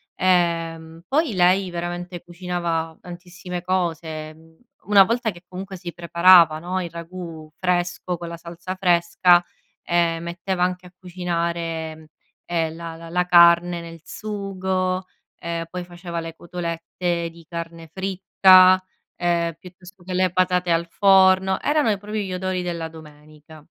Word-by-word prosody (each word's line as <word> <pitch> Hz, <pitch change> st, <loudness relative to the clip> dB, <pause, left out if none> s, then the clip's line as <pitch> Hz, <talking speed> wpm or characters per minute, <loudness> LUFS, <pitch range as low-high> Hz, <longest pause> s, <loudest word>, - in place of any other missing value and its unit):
ehm, 165 Hz, -2 st, 0 dB
poi 295 Hz, -4 st, +1 dB
lei 185 Hz, +1 st, +3 dB
veramente 175 Hz, 0 st, -5 dB
cucinava 170 Hz, -2 st, -3 dB
tantissime 180 Hz, 0 st, -8 dB
cose, 165 Hz, -4 st, -2 dB
mhmm, 160 Hz, +1 st, -21 dB, 0.3 s
una 200 Hz, -2 st, +7 dB
volta 230 Hz, +2 st, 0 dB
che 175 Hz, 0 st, -15 dB
comunque 190 Hz, +1 st, -7 dB
si 175 Hz, -1 st, -7 dB
preparava, 170 Hz, -1 st, +5 dB
no, 185 Hz, +2 st, -3 dB
il 170 Hz, -, -5 dB
ragù 170 Hz, -2 st, -9 dB
fresco 180 Hz, -1 st, -1 dB
con 170 Hz, 0 st, -7 dB
la 170 Hz, -, -7 dB
salsa 170 Hz, +2 st, -7 dB
fresca, 175 Hz, -1 st, +4 dB, 0.4 s
ehm, 170 Hz, -1 st, +1 dB
metteva 180 Hz, +1 st, -2 dB
anche 180 Hz, 0 st, -2 dB
a 180 Hz, -, -18 dB
cucinare, 170 Hz, -3 st, -4 dB, 0.4 s
ehm, 165 Hz, -2 st, -1 dB
la 165 Hz, -1 st, -7 dB
la 165 Hz, 0 st, -11 dB
la 180 Hz, +1 st, +1 dB
carne 170 Hz, 0 st, +6 dB
nel 165 Hz, -1 st, -10 dB
sugo, 190 Hz, -2 st, -3 dB, 0.3 s
ehm, 170 Hz, 0 st, -4 dB
poi 180 Hz, 0 st, -5 dB
faceva 175 Hz, -1 st, -6 dB
le 165 Hz, 0 st, -7 dB
cotolette 170 Hz, 0 st, -3 dB
di 165 Hz, 0 st, -16 dB
carne 165 Hz, -1 st, -7 dB
fritta, 185 Hz, -1 st, +5 dB, 0.3 s
ehm, 170 Hz, -1 st, 0 dB
piuttosto 180 Hz, 0 st, -15 dB
che 185 Hz, +1 st, -6 dB
le 185 Hz, -1 st, +2 dB
patate 180 Hz, -1 st, +1 dB
al 165 Hz, 0 st, +1 dB
forno, 190 Hz, -1 st, +4 dB
erano 295 Hz, -6 st, +2 dB
e 205 Hz, -, 0 dB
proprio 210 Hz, +2 st, -5 dB
gli 190 Hz, -2 st, -4 dB
odori 185 Hz, 0 st, -2 dB
della 170 Hz, -2 st, -3 dB
domenica. 155 Hz, -1 st, -15 dB
175 Hz, 140 wpm, -22 LUFS, 170-185 Hz, 0.4 s, una